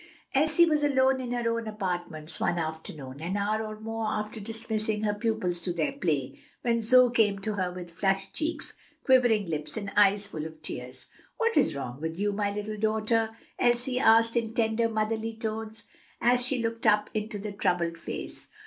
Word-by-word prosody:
Elsie 310 +4 +5
was 305 -3 +2
alone 265 -2 +3
in 245 -1 -4
her 240 -1 -1
own 230 -1 -4
apartments 175 -6 -4
one 175 - +1
afternoon, 155 -4 -5
an 180 +5 -2
hour 210 +2 0
or 215 0 -6
more 225 0 -3
after 215 +1 -3
dismissing 220 0 -2
her 210 -1 +1
pupils 205 -5 -1
to 175 - -2
their 170 -3 0
play, 160 - -2 0.2
when 235 -1 +2
Zoe 250 +2 +6
came 210 -4 +3
to 215 +1 -2
her 185 -3 -1
with 180 -1 -8
flushed 195 +2 0
cheeks, 320 +1 -2 0.3
quivering 245 -5 +4
lips, 155 +4 -4
and 200 -2 -4
eyes 205 0 +5
full 160 -6 -5
of 160 -1 -13
tears. 125 -3 -7 0.3
"What 460 -1 +1
is - - +3
wrong 130 0 -5
with 160 +1 -3
you, 205 +1 +1
my 205 0 -1
dear 205 +1 -3
little 215 0 -5 0.2
daughter?" 225 +1 +1 0.3
Elsie 245 +1 +2
asked 230 0 +5
in 230 -1 -1
tender, 230 0 +2
motherly 220 +1 -1
tones, 220 0 -4 0.4
as 245 +1 +3
she 250 -1 -1
looked 230 0 -1
up 210 0 +3
into 215 0 -2
the 205 +1 -5
troubled 175 -4 0
face. - - -6
215 Hz, 185 wpm, -28 LUFS, 185-230 Hz, 0.4 s, Zoe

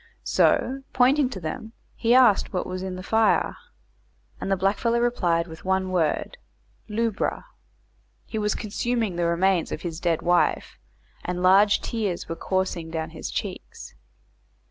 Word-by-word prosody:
So, 265 +2 +2
pointing 260 +2 +4
to 200 - -6
them, 220 +7 -6 0.2
he 235 +2 +2
asked 245 -6 +5
what 180 - -2
was 185 0 -5
in 190 -1 -4
the 185 - -7
fire, 220 +3 +2 0.8
and 195 - -3
the 195 - +2
blackfellow 205 +5 +1
replied 180 -9 +1
with 160 -1 -11
one 190 0 0
word 180 - 0 0.5
"lubra." 220 - -1 0.8
He 220 - -4
was 210 -1 0
consuming 225 -2 -2
the 170 0 0
remains 175 +1 +1
of - - -5
his 165 -2 -4
dead 170 -2 0
wife, 175 0 +1 0.4
and 180 0 -3
large 200 +3 +5
tears 205 -7 -3
were 165 - -4
coursing 185 -2 -2
down 160 -1 -4
his - - -6
cheeks. - - -6
190 Hz, 145 wpm, -25 LUFS, 175-225 Hz, 0.8 s, asked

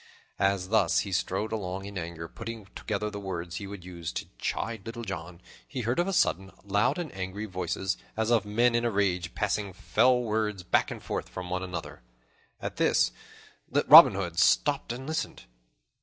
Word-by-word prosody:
As 95 -1 +1
thus 100 -6 +3
he 100 - -5
strode 95 +3 -1
along 95 -3 -3
in 100 0 -8
anger, 80 -2 -5
putting 110 +4 -7
together 105 0 -3
the 105 - -5
words 90 -2 -5
he 100 - -6
would 100 -3 -9
use 85 -3 -6
to - - -4
chide 110 -3 -3
Little 115 +2 -6
John, 90 -3 -6 0.3
he 130 - -4
heard, 120 +6 0
of 175 - +2
a - - 0
sudden, 95 - +2
loud 100 - +1
and 170 -6 -4
angry 95 +2 -4
voices, 95 0 -2 0.2
as 110 +1 +1
of 115 -2 +4
men 115 +4 +2
in 120 0 +1
a 120 - +2
rage, 95 -5 0
passing 100 -1 -1
fell 125 +5 +3
words 105 -4 -1
back 90 - +2
and - - -7
forth - - -4
from 90 -1 -7
one 90 0 -1
to 95 - -4
the 90 -2 -3
other. 80 - -9 0.6
At - - -5
this, - - +3 0.7
Robin - - +10
Hood 90 -3 -2
stopped 140 +8 +3
and 125 +3 -6
listened. 160 +2 -3
100 Hz, 190 wpm, -28 LUFS, 90-110 Hz, 0.7 s, Robin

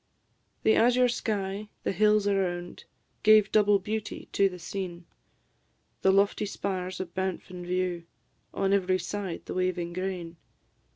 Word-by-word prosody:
The 220 - +5
azure 250 +2 +4
sky, 210 -3 -2
the - - 0
hills 210 +1 +3
around, 180 -3 -1 0.4
Gave 215 -1 +6
double 205 -1 +5
beauty 210 +2 -5
to 195 -1 +3
the 180 - -9
scene; 175 0 -6 1.0
The 190 - +5
lofty 200 +1 +2
spires 185 -2 -3
of 175 -2 -5
Banff 190 -1 -3
in 180 -1 -7
view 180 -1 -1 0.5
On 195 0 0
every 185 -2 +2
side 185 0 -5
the - - -5
waving 180 -2 -1
grain. 180 -2 -4
190 Hz, 135 wpm, -28 LUFS, 180-205 Hz, 1.0 s, Gave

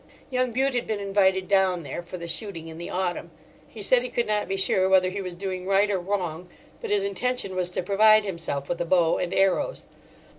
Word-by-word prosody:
Young 255 0 +1
Bute 265 +3 0
had 245 - -1
been 215 -2 -2
invited 190 -2 +1
down 190 -3 +2
there 155 - -5
for 175 +1 -8
the 170 - -7
shooting 170 -1 -3
in 160 0 -9
the 170 - -6
autumn. 180 -2 -2 0.4
He 215 - -9
said 245 +4 +4
he 250 - -5
could 240 -1 -1
not 210 -1 -1
be 195 - -2
sure 190 0 +2
whether 185 -1 +4
he 200 +1 -4
was 180 -2 -6
doing 185 0 -5
right 200 +1 +3
or 195 - 0
wrong, 180 -2 -3 0.3
but 460 - -5
his 410 -1 +1
intention 250 - -2
was 180 -1 -1
to 180 - -3
provide 215 +3 +5
himself 165 -7 -4
with 175 - -3
a - - 0
bow 170 -1 +3
and 180 - -2
arrows. 195 - +1
190 Hz, 225 wpm, -25 LUFS, 180-210 Hz, 0.4 s, provide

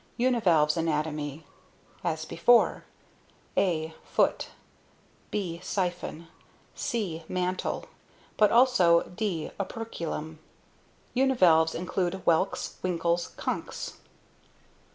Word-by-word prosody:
UNIVALVE'S 180 -12 +3
anatomy: 155 -2 -2 0.6
As 160 -2 -1
before, 235 +11 +3 0.7
a) 160 -4 +1
foot, - - +1 0.8
b) 175 -5 -3
siphon, 175 -3 -3 0.5
c) 185 -9 -3
mantle, 185 0 -2 0.5
but 210 -1 +4
also 230 -9 +5
d) 180 -5 -3
operculum. 170 -7 -5 0.8
Univalves 180 -12 +4
include 180 +1 -1
whelks, 170 +4 +1
winkles, 170 -1 0
conchs. - - -4
175 Hz, 75 wpm, -28 LUFS, 160-200 Hz, 0.8 s, also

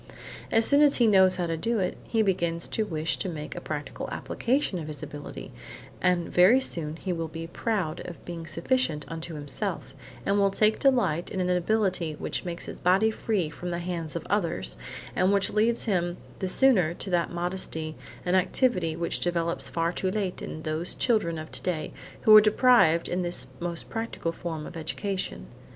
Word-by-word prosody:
As 225 0 +5
soon 285 +1 +5
as 290 -1 +6
he 240 - +4
knows 190 -3 +5
how 180 -1 -1
to 165 -1 -1
do 230 +8 -1
it, 185 -3 -1
he 225 -1 +1
begins 170 -4 0
to 220 -1 -1
wish 160 -2 -1
to 190 - -3
make 150 -3 -6
a - - -5
practical 150 -1 -5
application 245 -6 -1
of 155 - -6
his 150 -3 -5
ability, 145 0 -8 0.5
and 180 -2 +2
very 190 +9 +6
soon 160 -11 -1
he 180 +2 -3
will 165 -1 -3
be 165 +1 -6
proud 175 -2 -2
of 175 - -10
being 165 -2 -6
sufficient 165 - 0
unto 165 0 -6
himself, 145 -2 -4 0.3
and 200 +1 +2
will 200 0 +4
take 215 +2 +2
delight 210 - +2
in 190 - -4
an 180 0 +1
ability 180 -3 +1
which - - -4
makes 175 -1 -5
his - - -8
body 195 +5 +3
free 210 -6 -1
from 175 +3 -6
the 170 - -2
hands 170 -2 -4
of 170 - -4
others, 180 -5 0 0.4
and 185 +2 +3
which 200 -1 +2
leads 225 +2 +2
him 175 -5 0 0.2
the 190 - -1
sooner 185 -6 +3
to 190 - -6
that 175 -1 +1
modesty 175 -3 -2 0.3
and 180 +1 +2
activity 185 -3 +2
which 170 +1 -1
develops 170 -1 0
far 165 0 0
too 185 +1 -2
late 190 -2 -2
in 155 - -6
those 155 +3 -1
children 215 -9 +1
of 155 0 -7
today 170 -4 -3 0.3
who 215 - +8
are 215 - +11
deprived 215 -6 +4
of 180 +1 -1
this 175 0 0
most 170 -1 -4
practical 225 -7 -3
form 165 -2 -5
of - - -9
education. 185 - -3
180 Hz, 190 wpm, -27 LUFS, 165-205 Hz, 0.5 s, are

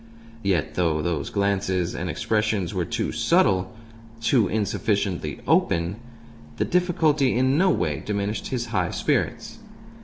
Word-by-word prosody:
Yet, 85 -6 0
though 80 -2 0
those 80 -4 -2
glances 95 -3 0
and 90 +1 -4
expressions 105 +2 0
were 90 -3 -1
too - - -2
subtle, 95 -2 +2 0.5
too 115 -1 +3
insufficiently 100 - -1
open, 85 +4 +2 0.6
the - - +1
difficulty 160 -7 +2
in 130 +2 +2
no 185 +5 +4
way 75 - 0
diminished 105 +1 -2
his 120 -2 -2
high 90 -4 +1
spirits. - - -1
100 Hz, 125 wpm, -24 LUFS, 85-115 Hz, 0.6 s, no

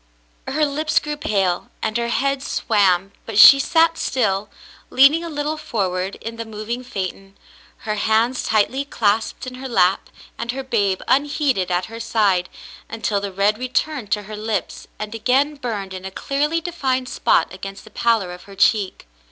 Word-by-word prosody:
Her 305 +2 +1
lips 305 +2 -1
grew 300 0 +1
pale, 195 -10 -1
and 220 -1 -1
her 235 0 -1
head 275 +3 0
swam, 195 -7 +1 0.2
but 220 -3 -4
she 275 +5 +10
sat 330 +3 +3
still, 205 -5 0 0.4
leaning 280 +6 +5
a 335 - -5
little 300 0 -2
forward 190 -8 -2
in 230 +1 -8
the 230 - -4
moving 220 +3 -5
phaeton, 195 -3 -6 0.5
her 215 - -1
hands 220 +4 +1
tightly 220 +6 +1
clasped 220 -5 -1
in 255 - -7
her 265 - -5
lap 190 -5 +2 0.3
and 235 +1 -3
her 270 +1 -5
babe 205 -7 0
unheeded 275 - +1
at 180 0 0
her 225 +1 -9
side, 205 -6 +1 0.4
until 215 -2 -1
the 200 -1 -4
red 200 +3 +1
returned 255 -2 -2
to 210 - -1
her 215 +2 -8
lips 215 -2 -4
and 215 +1 -6
again 260 +6 +1
burned 220 -9 -5
in 185 0 -7
a 190 - -5
clearly 295 +10 -1
defined 265 -7 -2
spot - - +1
against 195 0 -8
the 215 - -15
pallor 225 -5 +1
of 180 0 -11
her 200 - -13
cheek. 200 - +1
225 Hz, 170 wpm, -21 LUFS, 200-270 Hz, 0.5 s, she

